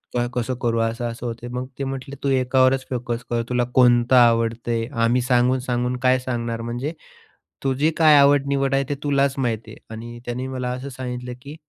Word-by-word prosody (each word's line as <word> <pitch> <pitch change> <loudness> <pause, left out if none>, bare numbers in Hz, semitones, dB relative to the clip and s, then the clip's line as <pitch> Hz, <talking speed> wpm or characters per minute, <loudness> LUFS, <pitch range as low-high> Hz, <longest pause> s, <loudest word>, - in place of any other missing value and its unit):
काय 120 0 +1
कसं 125 +1 -2
करू? 115 -1 +1
असं-असं 115 +1 -2
होत." 120 0 -5
मग 125 +1 -4
ते - - -1
म्हटले 135 +1 -5
"तू 140 - +1
एकावरच 130 0 +2
फोकस 120 -1 -3
कर. 120 -1 0
तुला 125 0 +1
कोणता 125 0 +5
आवडतंय, 115 0 0
आम्ही 115 +2 +2
सांगून-सांगून 125 0 +1
काय 130 0 +4
सांगणार? 120 -2 -3
म्हणजे 120 +6 -4 0.7
तुझी 135 +4 +1
काय 155 -2 +6
आवड-निवड 140 -1 +3
आहे 135 - +2
ते 145 - -1
तुलाच 140 -1 +1
माहिती 115 -4 -2
आहे." - - -15
आणि 120 +1 -8
त्याने 125 +2 -4
मला 130 -1 -3
असं 130 +2 -5
सांगितलं 125 -1 -6
की 145 +3 -9
125 Hz, 175 wpm, -22 LUFS, 120-130 Hz, 0.7 s, काय